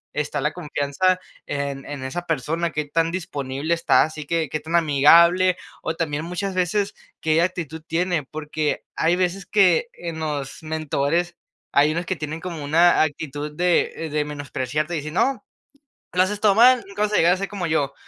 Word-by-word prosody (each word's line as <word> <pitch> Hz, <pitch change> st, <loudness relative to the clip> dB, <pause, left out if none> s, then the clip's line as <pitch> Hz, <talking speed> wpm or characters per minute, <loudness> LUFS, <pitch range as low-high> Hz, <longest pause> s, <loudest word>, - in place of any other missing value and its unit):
está 150 Hz, -2 st, -2 dB
la 150 Hz, -, 0 dB
confianza 175 Hz, +3 st, 0 dB, 0.3 s
en 140 Hz, -1 st, -3 dB
en 145 Hz, -2 st, -6 dB
esa 175 Hz, +7 st, -4 dB
persona. 165 Hz, +3 st, -1 dB
¿Qué 150 Hz, -1 st, -2 dB
tan 165 Hz, +3 st, 0 dB
disponible 150 Hz, -4 st, -3 dB
está? 170 Hz, -, +4 dB
Así 155 Hz, -1 st, -5 dB
que, 165 Hz, -2 st, 0 dB
¿qué 155 Hz, -, -2 dB
tan 160 Hz, +3 st, -3 dB
amigable 170 Hz, +4 st, +5 dB, 0.3 s
o 160 Hz, -, -2 dB
también 150 Hz, -2 st, -2 dB
muchas 185 Hz, +2 st, -3 dB
veces, 195 Hz, +3 st, 0 dB, 0.3 s
qué 160 Hz, +1 st, +2 dB
actitud 160 Hz, -3 st, -3 dB
tiene? 175 Hz, -1 st, 0 dB
Porque 150 Hz, +1 st, -3 dB
hay 170 Hz, +2 st, +2 dB
veces 185 Hz, +1 st, -1 dB
que 195 Hz, 0 st, +4 dB
en 170 Hz, -2 st, -6 dB
los 145 Hz, -3 st, -4 dB
mentores 160 Hz, +2 st, -1 dB, 0.4 s
hay 145 Hz, +2 st, +4 dB
unos 170 Hz, +1 st, -2 dB
que 185 Hz, -, -2 dB
tienen 155 Hz, +1 st, -5 dB
como 170 Hz, -5 st, -5 dB
una 165 Hz, +4 st, +4 dB
actitud 150 Hz, 0 st, -4 dB
de 175 Hz, -2 st, +1 dB
de 150 Hz, 0 st, +1 dB
menospreciarte 145 Hz, +2 st, -3 dB
y -, -, -1 dB
dicen: 155 Hz, +3 st, -6 dB
"No, 270 Hz, +5 st, +1 dB, 0.7 s
lo 180 Hz, +1 st, +4 dB
haces 205 Hz, +2 st, -1 dB
todo 205 Hz, -2 st, +5 dB
mal, 245 Hz, +2 st, +6 dB
nunca 200 Hz, +1 st, -4 dB
vas 210 Hz, -, -1 dB
a -, -, +5 dB
llegar 170 Hz, +2 st, +5 dB
a -, -, -3 dB
ser 195 Hz, -, -3 dB
como 195 Hz, -4 st, -4 dB
yo", 145 Hz, -3 st, 0 dB
160 Hz, 185 wpm, -23 LUFS, 150-180 Hz, 0.7 s, mal